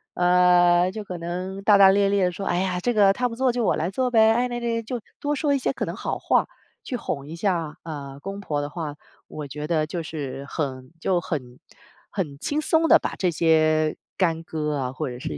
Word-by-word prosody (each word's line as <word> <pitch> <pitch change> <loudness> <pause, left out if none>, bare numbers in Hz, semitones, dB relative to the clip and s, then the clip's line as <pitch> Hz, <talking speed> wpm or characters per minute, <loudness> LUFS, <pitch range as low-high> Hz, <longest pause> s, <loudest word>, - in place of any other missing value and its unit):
呃， 180 0 +4
就 215 0 -7
可 180 -2 -6
能 180 +3 -5
大 205 0 +6
大 195 -1 +8
咧 200 0 +3
咧 200 -2 +2
地 180 - +1
说： 195 - -5
“哎 175 - 0
呀， 180 -1 -1
这 245 - +1
个 200 -2 +5
她 245 +3 0
不 230 - -7
做 260 -2 +2
就 245 -1 0
我 - - +2
来 160 +3 -1
做 250 +5 -1
呗， 220 -1 +5
哎， 245 +1 +1
那 240 0 -3
那” 230 -1 -2
就 240 +2 -4 0.2
多 295 0 0
说 290 0 +1
一 280 - +3
些 260 - -1
可 - - -3
能 - - -5
好 - - -3
话 - - +2 0.4
去 250 - -4
哄 140 -11 -4
一 155 - -8
下， 165 -6 -1
呃， 140 -4 -7
公 195 +4 -6
婆 150 -6 -2
的 145 0 -3
话， 150 -2 -5 0.3
我 150 -2 -7
觉 150 +2 -6
得 155 -1 0
就 170 +1 -4
是 140 -4 -6
很 130 -4 -4
就 175 0 +1
很 125 -7 -5 0.5
很 150 -8 -4
轻 290 - -2
松 320 +1 +2
地 - - +8
把 - - -4
这 180 -2 +1
些 155 -1 +3 0.2
干 165 -3 +1
戈 150 -2 -3
啊， 130 -3 -2
或 130 - -4
者 125 0 -7
是 75 - -5
175 Hz, 250 characters per minute, -24 LUFS, 155-210 Hz, 0.5 s, 大